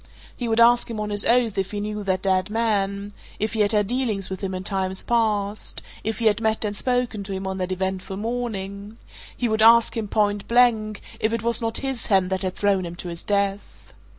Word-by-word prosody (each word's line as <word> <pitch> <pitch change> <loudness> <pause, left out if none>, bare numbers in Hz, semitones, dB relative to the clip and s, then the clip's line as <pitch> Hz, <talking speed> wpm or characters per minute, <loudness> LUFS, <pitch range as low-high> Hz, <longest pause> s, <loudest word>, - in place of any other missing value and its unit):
He 240 - -4
would 225 0 +1
ask 240 +1 +5
him 225 -2 -4
on 210 0 -3
his 205 0 0
oath 230 -4 +3
if 190 0 -1
he 205 - -4
knew 210 0 -4
that 190 -1 0
dead 190 0 +1
man 205 -2 -1 0.2
if 215 0 -2
he 225 - -2
had 205 -1 +3
had 210 -2 +3
dealings 220 -5 -1
with 190 - -5
him 190 -1 -2
in 185 - -5
times 190 -1 -1
past 215 -3 0 0.2
if 220 +1 -2
he 235 - -2
had 215 0 +3
met 220 0 +1
and 205 0 -2
spoken 245 -2 -1
to 195 0 -6
him 190 0 -4
on 190 0 -3
that 185 0 -2
eventful 190 +1 -3
morning 210 -2 -4 0.4
he 245 - 0
would 220 -1 0
ask 230 +2 +6
him, 225 -2 -2
point 205 -1 0
blank, 225 -3 +3 0.2
if 220 +1 0
it 230 -1 -2
was 235 0 +1
not 225 0 0
his 265 -4 -3
hand 190 -2 +3
that 190 - -1
had 185 -1 -3
thrown 200 -2 +1
him 170 0 -6
to 175 - -6
his 170 0 -5
death. 200 0 -2
210 Hz, 230 wpm, -23 LUFS, 195-225 Hz, 0.4 s, ask